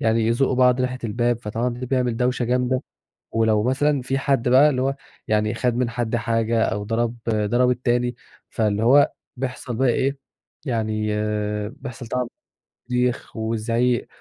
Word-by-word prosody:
يعني 110 0 +2
يزقّوا 130 +3 +2
بعض 125 0 +4
ناحية 130 0 -1
الباب. 120 +2 0
فطبعًا 115 +4 -1
ده 125 +1 -5
بيعمل 125 -2 0
دوشة 125 +1 0
جامدة. 125 +2 0 0.5
ولو 110 -2 +2
مثلًا 135 +2 +1
في 135 +1 -1
حد 135 -3 +1
بقى 135 +4 +6
اللي 130 -2 -1
هو 135 +1 0 0.3
يعني 105 +1 +1
خد 120 0 0
من 120 -1 0
حد 120 0 -1
حاجة، 115 0 +1
أو 105 -1 -2
ضرب 115 +2 -1
ضرب 115 +4 +2
التاني، 120 -1 0 0.4
فاللي 105 -2 0
هو 140 +5 +5 0.2
بيحصل 125 -1 -4
بقى 130 +1 +2
إيه، 135 +3 +1 0.5
يعني 110 -4 -1 0.6
بيحصل 130 -3 -9
طبعًا 125 +1 -2 0.6
صريخ 125 0 -1
وِزْعيق، 115 +2 0
120 Hz, 150 wpm, -23 LUFS, 115-125 Hz, 0.6 s, بقى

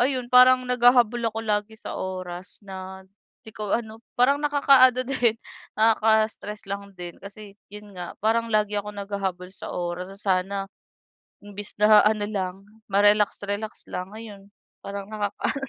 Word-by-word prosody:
ayun, 250 -1 0
parang 255 0 +7
naghahabol 245 -1 +4
ako 225 - -6
lagi 210 0 -1
sa - - -8
oras 185 +1 -6
na 190 0 -8 0.4
'di 220 - -10
ko 210 -2 -4
ano 220 -1 -8 0.2
parang 255 +3 +4
nakakaano 275 -4 +4
din 245 -4 +1 0.4
nakaka-stress 220 -1 +1
lang 200 0 -7
din. 175 -1 -9
Kasi 200 +1 -11 0.2
'yun 210 0 -12
nga, 180 -2 -8
parang 230 +1 +2
lagi 210 -1 +1
akong 205 0 -9
naghahabol 195 -2 -4
sa 190 - -7
oras 175 +1 -4
na 195 - -11
sana, 195 -1 0 0.9
imbis 205 0 -9
na 210 0 +7
ano 210 -1 +1
lang 195 -2 -4 0.2
ma-relax-relax 205 +1 +1
lang 185 +1 -4
ngayon 205 -2 -11 0.3
parang 200 0 -6
nakakaano 210 +6 -3
210 Hz, 140 wpm, -24 LUFS, 195-225 Hz, 0.9 s, parang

